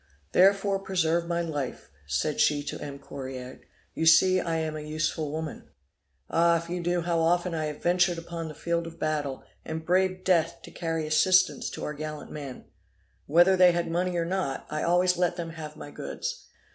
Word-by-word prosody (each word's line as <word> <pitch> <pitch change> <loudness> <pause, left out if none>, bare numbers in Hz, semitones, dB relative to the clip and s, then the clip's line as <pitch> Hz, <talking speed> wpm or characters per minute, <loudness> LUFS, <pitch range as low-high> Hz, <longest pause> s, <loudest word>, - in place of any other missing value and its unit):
'Therefore 195 +1 +4
preserve 170 -3 0
my 170 0 0
life,' 145 - -4 0.2
said 70 - -1
she 145 -1 +3
to - - -6
M. 145 -1 -6
Correard, 130 -2 -8 0.3
'you 160 - 0
see 185 +3 +6
I 165 -2 -1
am 160 -1 -2
an 150 0 -6
useful 155 -1 -1
woman. 160 0 -5 0.6
Ah! 170 0 +3
if 170 +1 -7
you 180 - -2
knew 175 0 0
how 170 0 0
often 175 +2 +2
I 155 -1 -1
have 150 -1 -6
ventured 175 0 +3
upon 165 0 -5
the 155 - -8
field 170 +1 -1
of 165 - -10
battle, 145 -3 -2 0.2
and 160 0 -5
braved 185 +1 +1
death 170 -2 +1
to - - -11
carry 165 -2 -2
assistance 155 0 +3
to - - -7
our 150 - -3
gallant 155 0 -6
men. 140 -4 -7 0.6
Whether 175 +5 +5
they 180 -1 +6
had 170 -1 -1
money 180 +1 0
or 170 - 0
not 175 -6 -2
I 155 0 -2
always 180 +1 +3
let 175 -1 +1
them 170 -2 -5
have 155 -2 -8
my 145 - -9
goods. 485 - -5
165 Hz, 190 wpm, -27 LUFS, 155-175 Hz, 0.6 s, see